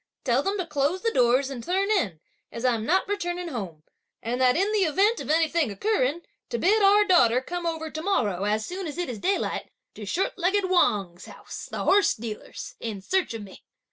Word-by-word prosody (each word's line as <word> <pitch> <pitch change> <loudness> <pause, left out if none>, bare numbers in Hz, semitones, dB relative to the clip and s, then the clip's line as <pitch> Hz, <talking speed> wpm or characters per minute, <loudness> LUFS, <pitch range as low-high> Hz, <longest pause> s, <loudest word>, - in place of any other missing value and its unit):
Tell 250 0 +2
them 395 +6 -1
to 370 - -2
close 305 +3 -1
the 455 - +1
doors 255 +2 +3
and 245 -4 -6
turn 390 - 0
in, 200 - 0 0.3
as 230 +2 -5
I'm 230 -3 +1
not 375 +4 +2
returning 355 -3 -3
home; 185 - -6 0.4
and 245 +3 -2
that 255 +2 +4
in 395 +4 +1
the 430 - +1
event 390 +6 +2
of - - -7
anything 320 -2 +2
occurring, 335 - 0 0.3
to 475 - -2
bid 420 +5 +3
our 410 +1 +5
daughter 255 - +4
come 345 +6 -4
over 320 -1 -3
to 315 - -5
morrow, 210 - 0
as 215 +1 0
soon 370 0 -5
as 300 - -6
it 350 -4 -2
is 230 -4 -5
daylight, 385 - -1 0.2
to 210 -2 -9
short 375 - -1
legged 380 +2 +1
Wang's 195 - +1
house, - - -9
the - - -4
horse 405 +1 +4
dealer's, 220 -2 -7
in 220 -4 -5
search 360 - -1
of 220 - -6
me!" 195 -2 -13
320 Hz, 205 wpm, -26 LUFS, 235-380 Hz, 0.4 s, our